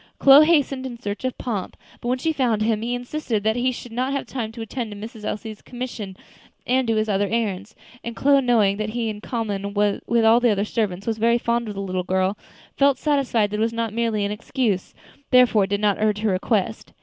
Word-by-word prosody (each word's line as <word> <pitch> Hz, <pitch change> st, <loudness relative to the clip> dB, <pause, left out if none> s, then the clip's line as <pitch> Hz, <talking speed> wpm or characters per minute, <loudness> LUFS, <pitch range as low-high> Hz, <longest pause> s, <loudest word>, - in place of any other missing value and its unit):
Chloe 280 Hz, +3 st, +8 dB
hastened 275 Hz, -5 st, +2 dB
in 240 Hz, -2 st, -8 dB
search 205 Hz, -2 st, -5 dB
of 255 Hz, -, -2 dB
Pomp, 210 Hz, -6 st, -4 dB, 0.2 s
but 240 Hz, -, -5 dB
when 250 Hz, +1 st, +1 dB
she 320 Hz, +5 st, -1 dB
found 235 Hz, -7 st, +1 dB
him, 220 Hz, -1 st, +1 dB
he 240 Hz, +2 st, -1 dB
insisted 245 Hz, -3 st, -3 dB
that 220 Hz, +1 st, +2 dB
he 250 Hz, +1 st, +1 dB
should 245 Hz, -1 st, -9 dB
not 255 Hz, +4 st, -1 dB
have 275 Hz, -, -2 dB
time 230 Hz, -4 st, -4 dB
to 230 Hz, 0 st, -8 dB
attend 230 Hz, +1 st, -4 dB
to 205 Hz, -, -8 dB
Miss 220 Hz, +3 st, -8 dB
Elsie's 215 Hz, 0 st, -5 dB
commission 240 Hz, -6 st, -6 dB, 0.5 s
and 255 Hz, 0 st, +1 dB
do 225 Hz, -, +2 dB
his 215 Hz, 0 st, +1 dB
other 200 Hz, -1 st, +1 dB
errands; 210 Hz, -3 st, -2 dB, 0.3 s
and 235 Hz, 0 st, -5 dB
Chloe, 280 Hz, +2 st, +4 dB
knowing 220 Hz, -6 st, +3 dB
that 215 Hz, 0 st, -2 dB
he, 230 Hz, 0 st, -2 dB
in 210 Hz, -1 st, -6 dB
common 205 Hz, -4 st, -3 dB
with 210 Hz, +3 st, +1 dB
all 225 Hz, +2 st, +6 dB
the 245 Hz, -1 st, +3 dB
other 205 Hz, -1 st, +1 dB
servants, 200 Hz, -4 st, -2 dB
was 225 Hz, -1 st, -2 dB
very 235 Hz, +1 st, +3 dB
fond 235 Hz, 0 st, -1 dB
of 210 Hz, -, -5 dB
the 195 Hz, -, -4 dB
little 185 Hz, -1 st, -2 dB
girl, 185 Hz, +2 st, 0 dB, 0.4 s
felt 280 Hz, -1 st, +3 dB
satisfied 260 Hz, -8 st, +1 dB
that 210 Hz, -, -2 dB
it -, -, -3 dB
was 225 Hz, +1 st, +1 dB
not 230 Hz, -2 st, -2 dB
merely 225 Hz, -3 st, 0 dB
an 200 Hz, -, -2 dB
excuse, 210 Hz, -2 st, -2 dB, 0.3 s
therefore 245 Hz, -6 st, +5 dB
did 200 Hz, 0 st, -1 dB
not 205 Hz, -1 st, +2 dB
urge 210 Hz, -1 st, +1 dB
her 215 Hz, -2 st, +1 dB
request. 200 Hz, +3 st, -1 dB
225 Hz, 225 wpm, -23 LUFS, 205-245 Hz, 0.5 s, Chloe